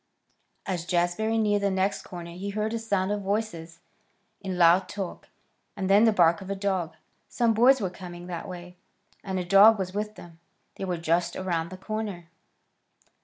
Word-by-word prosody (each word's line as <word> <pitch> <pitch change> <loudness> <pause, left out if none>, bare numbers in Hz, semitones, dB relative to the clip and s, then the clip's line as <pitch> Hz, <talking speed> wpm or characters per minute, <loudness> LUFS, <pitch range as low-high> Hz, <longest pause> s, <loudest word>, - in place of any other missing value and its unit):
As 180 -4 -2
Jazbury 180 +6 0
neared 205 -2 +2
the 200 - +1
next 190 +1 0
corner 170 -1 -9
he 185 +4 -6
heard 215 +2 -2
a 230 - -1
sound 200 -3 -1
of 205 0 -1
voices 190 -5 -3 0.6
in 190 -2 -4
loud 175 +2 +5
talk, 195 -3 -6 0.5
and 195 -1 -1
then 205 +3 +6
the 225 - +5
bark 170 -4 +3
of 190 - -9
a 200 - -1
dog. 190 -4 -2 0.3
Some 235 -2 +2
boys 250 +4 +5
were 190 -5 -2
coming 175 -1 -9
that 175 -2 -6
way, 180 0 -9 0.5
and 190 -1 -3
a 180 - -2
dog 200 +5 +7
was 185 -1 -4
with 210 +1 -3
them. 170 -4 -13 0.3
They 195 - -5
were 180 -2 -2
just 170 +1 0
around 170 -3 -2
the 185 - -9
corner. 200 -4 -5
190 Hz, 180 wpm, -26 LUFS, 175-205 Hz, 0.6 s, dog